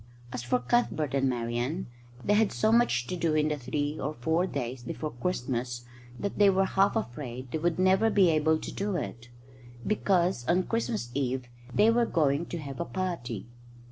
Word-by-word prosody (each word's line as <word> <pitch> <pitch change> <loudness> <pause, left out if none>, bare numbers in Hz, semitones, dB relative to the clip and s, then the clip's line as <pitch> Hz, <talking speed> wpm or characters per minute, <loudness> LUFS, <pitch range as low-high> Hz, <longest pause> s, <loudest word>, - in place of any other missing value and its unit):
As - - -3
for 120 +1 +1
Cuthbert 150 - 0
and 135 -1 +2
Marian, 120 +7 -2 0.4
they 205 - +3
had 215 -1 +3
so 215 - +2
much 230 - +3
to 180 - -3
do 165 -3 +1
in 155 0 +2
the 150 - 0
three 145 +3 -2
or 150 +2 -3
four 160 +9 +1
days 125 -5 -4
before 150 +5 -4
Christmas 120 -4 -3 0.3
that 200 - -4
they 205 -1 +7
were 195 0 +3
half 195 +2 +2
afraid 130 - -4
they 160 - -1
would 170 +1 0
never 190 +4 +4
be 195 -5 +5
able 155 0 +3
to - - -6
do 200 -1 -2
it, 120 -7 -5 0.6
because 185 -9 +1
on 180 +2 +3
Christmas 115 -3 -2
Eve 130 -1 -1 0.3
they 215 - +5
were 235 0 +3
going 150 0 +1
to 175 - -4
have 140 -5 -7
a - - -1
party. 120 - -3
150 Hz, 185 wpm, -29 LUFS, 125-185 Hz, 0.6 s, they